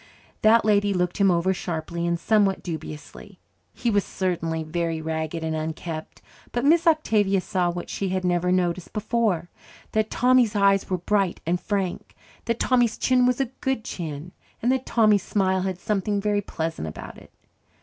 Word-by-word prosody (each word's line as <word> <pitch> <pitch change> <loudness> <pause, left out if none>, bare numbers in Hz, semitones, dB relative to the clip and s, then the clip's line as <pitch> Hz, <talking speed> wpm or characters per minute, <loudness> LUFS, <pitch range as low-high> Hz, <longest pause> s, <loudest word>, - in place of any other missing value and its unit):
That 220 0 +5
lady 205 -2 +3
looked 180 -1 0
him 200 -1 +4
over 180 +2 +2
sharply 170 -1 -3
and 170 0 0
somewhat 205 -1 +2
dubiously. 160 +4 -8 0.3
He 235 - -1
was 205 -2 +2
certainly 165 -3 -2
very 165 0 -2
ragged 160 +1 -3
and 160 0 -1
unkempt. 155 0 -5 0.3
But 240 +2 -1
Miss 335 +3 +4
Octavia 215 -11 +3
saw 180 -1 0
what 175 0 -5
she 195 - -3
had 185 0 -1
never 180 0 +1
noticed 180 -1 0
before 210 -6 0 0.4
that 215 0 +1
Tommy's 250 -3 +3
eyes 195 -1 +3
were 185 - 0
bright 195 0 0
and 175 +2 0
frank, 195 -3 -3 0.3
that 230 0 -1
Tommy's 245 -3 +2
chin 250 -1 +3
was 250 0 +1
a 270 - +2 0.2
good 265 -4 -1
chin, 160 -1 -6 0.3
and 245 - +1
that 260 0 -1
Tommy's 215 -3 +4
smile 190 -1 0
had 190 -1 -2
something 205 0 -1
very 205 0 0
pleasant 160 - -4
about 80 - -8
it. - - -18
190 Hz, 170 wpm, -24 LUFS, 170-215 Hz, 0.4 s, That